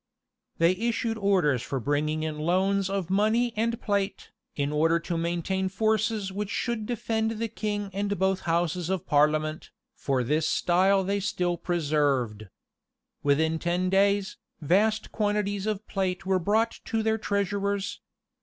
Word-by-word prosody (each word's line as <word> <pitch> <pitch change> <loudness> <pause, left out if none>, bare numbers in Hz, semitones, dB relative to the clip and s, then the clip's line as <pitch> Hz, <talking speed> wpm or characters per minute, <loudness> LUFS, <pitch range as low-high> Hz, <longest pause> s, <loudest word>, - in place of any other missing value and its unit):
They 165 +1 +4
issued 230 +3 -1
orders 180 - +2
for 135 +2 -3
bringing 150 +5 0
in 155 -1 -3
loans 190 +4 +1
of 195 -3 -2
money 220 +4 +2
and 230 +2 0
plate, 200 -2 -2 0.2
in 140 0 -1
order 165 +3 +3
to 170 - -3
maintain 175 +3 -1
forces 215 0 0
which 200 +1 -4
should 220 -1 -2
defend 225 -1 -1
the 230 +1 -1
king 205 -2 -3
and 200 +1 -1
both 190 +1 +1
houses 170 +1 0
of 190 -1 -1
parliament; 155 0 +1 0.2
for 135 -3 -1
this 155 +5 +1
style 190 +2 +3
they 200 +2 0
still 180 -3 -1
preserved. 145 - 0 0.7
Within 160 +3 +2
ten 180 +2 0
days, 200 0 +2 0.2
vast 210 +8 +1
quantities 205 -1 -1
of 215 -1 -3
plate 190 -1 -2
were 190 -1 +2
brought 220 +6 +1
to 225 -1 -1
their 220 0 +1
treasurers. 200 0 -1
190 Hz, 145 wpm, -27 LUFS, 165-205 Hz, 0.7 s, They